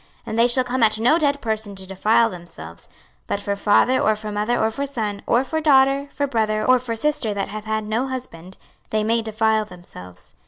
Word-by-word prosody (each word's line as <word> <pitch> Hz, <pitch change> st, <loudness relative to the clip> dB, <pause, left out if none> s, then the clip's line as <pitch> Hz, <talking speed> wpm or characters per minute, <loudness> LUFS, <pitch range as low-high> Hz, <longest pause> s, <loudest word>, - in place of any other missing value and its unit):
26:044:025 -, -, -30 dB, 0.2 s
And 220 Hz, -, -3 dB
they 235 Hz, -, +5 dB
shall 255 Hz, +1 st, +2 dB
come 250 Hz, +1 st, -2 dB
at 215 Hz, -1 st, +3 dB
no 250 Hz, +9 st, +3 dB
dead 285 Hz, -2 st, +1 dB
person 220 Hz, -3 st, -3 dB
to 190 Hz, 0 st, -7 dB
defile 215 Hz, +4 st, +2 dB
themselves: 165 Hz, -, -11 dB, 0.4 s
but 200 Hz, -, -2 dB
for 200 Hz, 0 st, -2 dB
father, 210 Hz, +5 st, +3 dB
or 215 Hz, -, +2 dB
for 215 Hz, 0 st, -7 dB
mother, 210 Hz, +4 st, -1 dB
or 220 Hz, 0 st, +1 dB
for 280 Hz, +5 st, -3 dB
son, 215 Hz, -7 st, -4 dB
or 240 Hz, +2 st, +3 dB
for 315 Hz, +3 st, -3 dB
daughter, 275 Hz, -1 st, +4 dB
for 285 Hz, -, -1 dB
brother, 215 Hz, -4 st, 0 dB
or 255 Hz, 0 st, +5 dB
for 235 Hz, -2 st, -4 dB
sister 275 Hz, -4 st, -1 dB
that 195 Hz, -, -3 dB
hath 215 Hz, +1 st, -7 dB
had 220 Hz, -1 st, -2 dB
no 230 Hz, +5 st, -1 dB
husband, 190 Hz, -9 st, -8 dB, 0.3 s
they 215 Hz, -1 st, 0 dB
may 230 Hz, +2 st, +1 dB
defile 220 Hz, 0 st, +1 dB
themselves. 135 Hz, -, -13 dB
220 Hz, 220 wpm, -21 LUFS, 205-255 Hz, 0.4 s, they